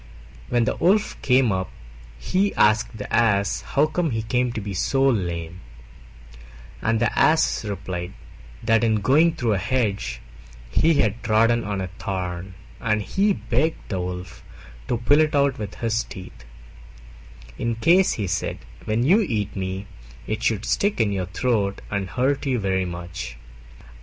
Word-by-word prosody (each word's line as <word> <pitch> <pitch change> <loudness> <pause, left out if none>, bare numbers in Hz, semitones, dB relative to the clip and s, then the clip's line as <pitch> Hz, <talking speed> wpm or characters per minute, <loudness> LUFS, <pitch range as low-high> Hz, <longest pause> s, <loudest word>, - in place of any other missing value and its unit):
When 120 -1 +2
the - - 0
Wolf 205 +4 +2
came 125 -3 +3
up, 95 -1 -2 0.5
he 190 - 0
asked 110 +1 +3
the 105 - -3
Ass 100 -4 +2
how 145 - +2
he 155 -8 -1
came 125 +2 0
to 115 - -3
be 100 -1 -5
so 135 +9 +1
lame, 90 -8 -1 1.2
and 115 0 +1
the 120 - 0
Ass 160 -5 +3
replied 95 -4 -5 0.5
that 115 0 +3
in 110 -1 +3
going 150 +10 +3
through 120 -8 0
a - - +1
hedge 100 - -1 0.5
he 160 - +3
had 110 -4 +1
trodden 115 +2 +3
on 100 -2 -3
a 95 - -3
thorn, 90 -2 -4 0.2
and 105 -2 0
he 200 - +1
begged 155 +1 -1
the 95 -3 -2
Wolf 90 0 -6 0.4
to 120 - 0
pull 145 +6 +3
it 155 -1 +2
out 140 -3 +2
with 105 -2 -5
his 115 -1 0
teeth, 90 -8 -11 1.1
"In 115 -1 -1
case," 175 +10 +4
he 105 - -2
said, 90 0 -2 0.3
"when 110 +2 0
you 185 - +5
eat 110 - -2
me, 95 0 -4 0.4
it 110 - -3
should 110 -2 0
stick 205 +1 +1
in 110 -3 +2
your 95 -2 -2
throat 100 0 0
and 100 -2 -2
hurt 135 - 0
you 130 -2 +1
very 95 -3 0
much." 85 -8 -6
110 Hz, 155 wpm, -23 LUFS, 95-130 Hz, 1.2 s, you